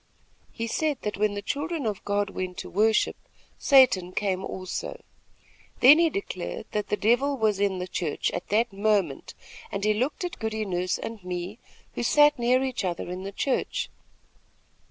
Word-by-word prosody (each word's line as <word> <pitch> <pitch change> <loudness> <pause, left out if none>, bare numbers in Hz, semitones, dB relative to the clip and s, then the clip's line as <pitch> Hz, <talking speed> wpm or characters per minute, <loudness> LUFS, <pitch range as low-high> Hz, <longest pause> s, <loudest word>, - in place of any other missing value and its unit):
He 230 - -4
said 295 +5 0
that 210 -1 -3
when 210 0 +1
the 205 - -5
children 295 +3 -2
of 210 -3 -2
God 205 -1 0
went 185 -1 -5
to - - -7
worship, 215 +3 +2 0.4
Satan 245 - +5
came 190 -2 -1
also. 190 - -5 0.8
Then 285 +6 +8
he 335 -1 +4
declared 395 +4 -5
that 210 -1 -2
the 210 - 0
Devil 265 +7 +2
was 215 -4 +1
in 200 -2 +1
the 180 - -3
church 170 -4 -2
at 175 - -5
that 220 +1 +1
moment, 200 -7 0 0.4
and 200 - -3
he 215 0 +3
looked 255 - -1
at 355 - -5
Goody 220 -1 -2
Nurse 180 -1 -1
and 225 -4 -7
me, 180 +4 -5 0.3
who - - -3
sat 295 +3 +5
near 250 +2 +3
each 260 -4 -2
other 175 -1 -3
in 180 +1 -5
the 195 +1 -5
church. 260 +6 -1
210 Hz, 175 wpm, -26 LUFS, 190-255 Hz, 0.8 s, Then